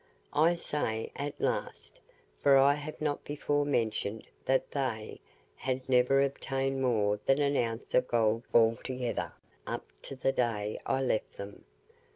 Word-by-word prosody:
I 165 +4 +4
say 115 -9 -2
AT 145 0 -4
LAST, - - -3 0.4
for 140 -1 +6
I 140 +1 +6
have 150 +1 -6
not 145 -1 -1
before 145 0 -1
mentioned 110 -4 -1 0.2
that 130 0 +1
they 125 -6 -3 0.4
had 130 0 -3
never 130 +2 +4
obtained 135 -1 -1
more 105 -5 +2
than 135 - +5
an 145 -1 +2
ounce 115 -2 -2
of 125 0 +3
gold 115 -1 +2
altogether, 120 +2 +1 0.3
up - - -4 0.2
to 135 - -7
the 135 +1 +1
day 110 -5 -1
I 135 0 +1
left 115 -4 0
them. 100 0 -9
130 Hz, 145 wpm, -30 LUFS, 115-140 Hz, 0.4 s, for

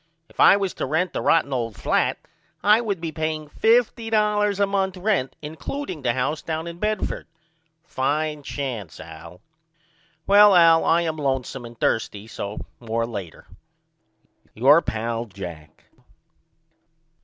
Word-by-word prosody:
If - - -22
I 200 - +7
was 195 -2 -2
to - - -4
rent 160 +6 0
the - - -2
rotten 140 -4 +2
old 115 -4 -2
flat - - 0 0.5
I 210 +3 +5
would 205 -6 -2
be 165 -1 -4
paying 155 0 -3
$50 215 -2 +2
a 200 - +4
month 195 -1 -1
rent 180 -8 0
includeing 160 - -6
the 120 -3 +1
house 135 +5 -1
down 160 0 -4
in 170 0 -8
Bedford. 215 0 -2 0.6
Fine 150 0 -2
chance 125 - -5
Al. 85 0 -11 0.8
Well 205 0 +7
Al 165 -2 +6
I 170 +1 +3
am 160 -1 -2
lonesome 135 -3 -2
and 115 -1 -12
thirsty 105 -2 -1
so 105 -2 -6
more 115 0 -2
later. 100 -8 -8 1.1
Your 140 +8 +6
pal, 115 -1 -3
JACK. 85 -8 -10
155 Hz, 135 wpm, -23 LUFS, 115-190 Hz, 1.1 s, I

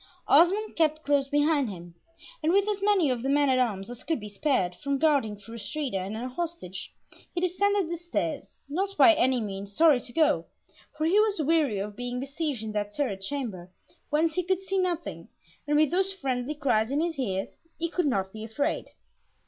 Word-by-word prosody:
Osmond 400 +6 +4
kept 310 -1 +1
close 285 -1 +2
behind 290 -2 +2
him, 175 -3 -9 0.5
and 315 +1 +2
with 400 +2 +3
as 410 -2 -1
many 395 -8 +3
of 245 -2 -2
the 270 - -2
men 285 0 +3
at 255 - +3
arms 205 -6 0
as 245 0 -8
could 325 -4 -1
be 210 - -7
spared 205 -4 0
from 280 +5 -1
guarding 275 -9 +2
Fru 210 +3 -12
Astrida 230 +1 -3
and 190 +3 -4
her 245 +3 -4
hostage, 315 - -5 0.4
he - - +1
descended 390 +1 +1
the 340 +1 -3
stairs, 345 +1 -4
not 385 +7 -2
by 340 - +8
any 260 -4 +2
means 200 -2 -5
sorry 315 -5 +6
to 240 - -7
go, 310 +1 +2 0.5
for 310 - 0
he 370 +6 +4
was 425 -4 +2
weary 295 -7 +2
of 205 +1 -4
being 245 +1 -3
besieged 275 -2 -3
in 220 - -4
that 205 -1 -3
turret 230 -10 -1
chamber, 195 -7 -4 0.4
whence 315 +2 +2
he 365 - +1
could 370 +1 0
see 385 0 -1
nothing, 350 -2 -2 0.4
and 295 0 +3
with 310 -1 +4
those 380 +2 +1
friendly 270 -4 -2
cries 245 -7 +1
in 280 +2 0
his 325 -2 -1
ears, 195 -6 -3 0.2
he 335 - -1
could 340 -1 0
not 190 -7 -1
be 215 0 -7
afraid. 225 +6 -2
285 Hz, 200 wpm, -27 LUFS, 220-335 Hz, 0.5 s, by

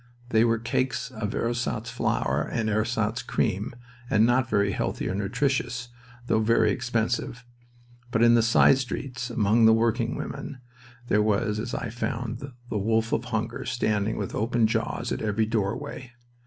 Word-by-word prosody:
They 110 -2 +4
were 115 -1 +3
cakes 115 +2 -1
of 105 -1 -4
ersatz 115 -1 -2
flour 120 - 0
with 110 -1 0
ersatz 110 +1 0
cream, 110 -3 -1 0.3
and 110 +1 +4
not 120 +1 +2
very 100 -3 +2
healthy - - -2
or - - -1
nutritious, 125 +4 -1 0.4
though 110 -2 +2
very 115 +1 +3
expensive. 120 0 -2 0.6
But 115 -1 +2
in 120 0 +6
the 120 - +5
side 120 +3 +5
streets, 125 -1 -4
among 115 0 +3
the 110 - +7
working 115 +1 +1
women, 140 -1 -6 0.5
there 105 - +3
was, 105 0 +1
as 120 +2 -4
I 115 - -4
found, 120 -1 -3 0.3
the 105 - 0
wolf 110 +2 +1
of 120 - 0
hunger 115 -1 -3
standing 110 -2 0
with 100 -3 -4
open 115 +1 +1
jaws 115 +2 -1
by - - -6
every 110 +1 +1
doorway. 115 +4 -3
115 Hz, 155 wpm, -26 LUFS, 110-120 Hz, 0.6 s, the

